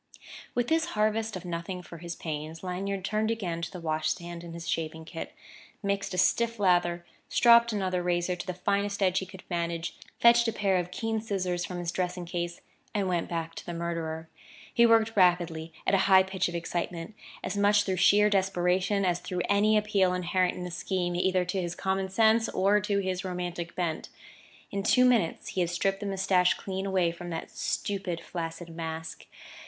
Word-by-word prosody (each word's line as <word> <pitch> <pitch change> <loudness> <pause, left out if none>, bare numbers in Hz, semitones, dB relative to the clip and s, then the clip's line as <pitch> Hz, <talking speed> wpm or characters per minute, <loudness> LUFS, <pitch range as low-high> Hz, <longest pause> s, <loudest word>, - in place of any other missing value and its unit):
With 245 0 +1
this 325 0 +2
harvest 215 0 +1
of 185 - -7
nothing 175 +1 -4
for 170 -1 -10
his 170 0 -6
pains, 155 +1 -5
Lanyard 190 +1 -3
turned 215 +1 0
again 180 -7 -2
to 170 - -3
the 180 - -8
wash 155 -1 -1
stand 170 -1 -4
and 170 -1 -8
his 170 0 -7
shaving 160 0 -3
kit, 165 0 -7 0.5
mixed 200 -1 -1
a - - -4
stiff 230 +5 +2
lather, 175 -3 +2 0.2
stropped 235 -1 +6
another 185 -4 -1
razor 175 0 0
to 180 - -7
the 185 - -3
finest 200 +2 0
edge 185 -1 +3
he 190 - -6
could 190 0 -12
manage, 170 -1 -2 0.2
fetched 235 0 +6
a - - +2
pair 195 -3 +1
of 180 -1 -2
keen 225 +3 -2
scissors 185 -5 -2
from 180 +1 -5
his 175 -1 -2
dressing 180 0 -2
case, 175 0 -4 0.3
and 200 -2 +1
went 175 -2 -1
back 165 -1 -3
to - - -8
the 175 - -6
murderer. 165 -1 -3 0.5
He 235 -1 +6
worked 225 0 +4
rapidly, 175 -4 +2
at - - +1
a - - +6
high 190 -1 +8
pitch 190 -1 -1
of 170 - -6
excitement 170 +1 -3 0.3
as - - -3
much 205 +1 +4
through 190 -2 -1
sheer 205 +3 +5
desperation 190 0 +1
as 180 -1 +1
through 180 0 -3
any 210 +2 +4
appeal 200 -3 +2
inherent 180 0 +1
in 180 - -6
the 180 - -5
scheme 175 0 -2
either 185 0 +2
to 185 +1 -1
his 175 -1 -3
common 190 0 -1
sense 220 +3 +3
or 200 +2 +3
to 205 0 0
his 185 -2 -1
romantic 175 -2 -4
bent. 170 -3 -2 0.6
In 200 - -1
two 250 +5 +4
minutes 230 -10 +2
he 185 - -1
had 175 - +1
stripped 195 +3 0
the 205 - -4
moustache 190 -2 +3
clean 190 0 -4
away 185 -3 +2
from 175 +1 -8
that 165 -1 -5
stupid, 195 -4 -2
flaccid 165 0 -6
mask. 160 -1 -6
180 Hz, 195 wpm, -28 LUFS, 170-200 Hz, 0.6 s, high